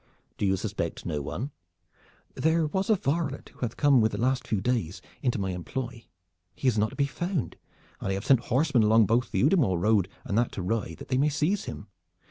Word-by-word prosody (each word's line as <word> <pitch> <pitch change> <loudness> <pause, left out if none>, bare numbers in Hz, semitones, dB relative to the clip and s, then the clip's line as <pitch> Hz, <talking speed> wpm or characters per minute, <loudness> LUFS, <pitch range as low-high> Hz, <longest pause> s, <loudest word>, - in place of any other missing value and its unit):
"Do 100 - +1
you 95 0 +2
suspect - - -4
no 75 - -2
one?" 120 - -4 0.8
"There 160 +1 +2
was 190 +6 -1
a 220 - +6
varlet 150 -4 -2
who - - -23
hath 120 -3 -3
come 140 -4 +5
with 110 0 +2
the - - -2
last 130 +2 0
few 110 - 0
days 100 -5 -1 0.2
into 125 -3 +1
my 95 -2 -1
employ. 120 +6 -5 0.5
He 135 - -2
is 125 - +3
not 110 0 +2
to - - -11
be 140 - +2
found, 175 - -3 0.4
and - - -3
I - - +1
have 100 +2 -4
sent 135 -4 +5
horsemen 135 -1 +2
along 110 +1 +5
both 115 +3 +1
the - - 0
Udimore 140 - +3
road 100 -1 +2 0.2
and 100 - -2
that 120 - +1
to 95 - -4
Rye, 100 -3 -2
that - - -11
they 130 -1 +1
may 145 +2 +3
seize 155 +8 0
him. - - -7
125 Hz, 220 wpm, -27 LUFS, 105-145 Hz, 0.8 s, a